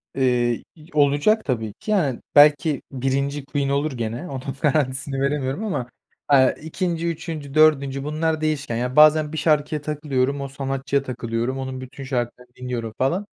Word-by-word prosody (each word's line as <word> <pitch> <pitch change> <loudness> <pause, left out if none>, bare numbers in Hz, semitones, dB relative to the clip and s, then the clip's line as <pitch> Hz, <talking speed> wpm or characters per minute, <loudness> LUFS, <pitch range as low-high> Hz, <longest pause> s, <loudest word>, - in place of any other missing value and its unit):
Eee, 125 -3 +1
y 155 -1 -16
olacak 145 +9 +3
tabii 110 -5 -2
ki. 215 - -6
Yani, 150 - +1
belki 145 0 +5
1'inci 140 +2 -1
Queen 140 -1 -1
olur 140 +2 0
gene. 120 +6 -4
Onun 135 0 -5
garantisini 140 -2 0
veremiyorum 140 +4 -1
ama, 135 - -3 0.4
aaa, 130 -3 +5
2'nci, 170 +1 -3
3'üncü, 160 -4 -5
4'üncü 140 -3 +3
bunlar 155 +1 -1
değişken. 150 -5 -1
Yani, 125 +2 -2
bazen 155 0 +6
bir - - -3
şarkıya 150 -1 +1
takılıyorum, 140 -2 -1
o 140 - -3
sanatçıya 135 0 -2
takılıyorum. 120 0 -3
Onun 130 -1 -5
bütün 130 +2 -9
şarkılarını 125 -1 -4
dinliyorum 120 -3 -4
falan. 170 +10 0
140 Hz, 150 wpm, -22 LUFS, 130-150 Hz, 0.4 s, bazen